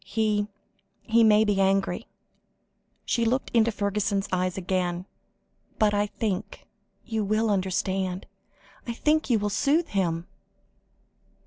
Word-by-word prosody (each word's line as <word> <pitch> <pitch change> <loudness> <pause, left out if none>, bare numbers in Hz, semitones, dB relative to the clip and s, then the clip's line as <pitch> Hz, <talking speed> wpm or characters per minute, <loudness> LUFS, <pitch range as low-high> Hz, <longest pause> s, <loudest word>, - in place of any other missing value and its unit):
He 210 -1 0 0.6
he 230 +1 +4
may 215 0 +5
be 200 -2 +2
angry," 195 0 +1 1.0
she 235 - +1
looked 250 +4 0
into 230 -1 +3
Fergusson's 200 -1 -1
eyes 185 0 0
again, 180 -1 -1 0.7
"but 210 -1 +3
I 205 0 +1
think 205 -1 -4 0.4
you 220 -2 -1
will 215 +2 +1
understand 190 -1 -1 0.6
I 235 - -2
think 305 +6 +1
you 235 - +4
will 205 0 -1
soothe 300 - +1
him." 170 -4 -1
205 Hz, 120 wpm, -26 LUFS, 190-220 Hz, 1.0 s, may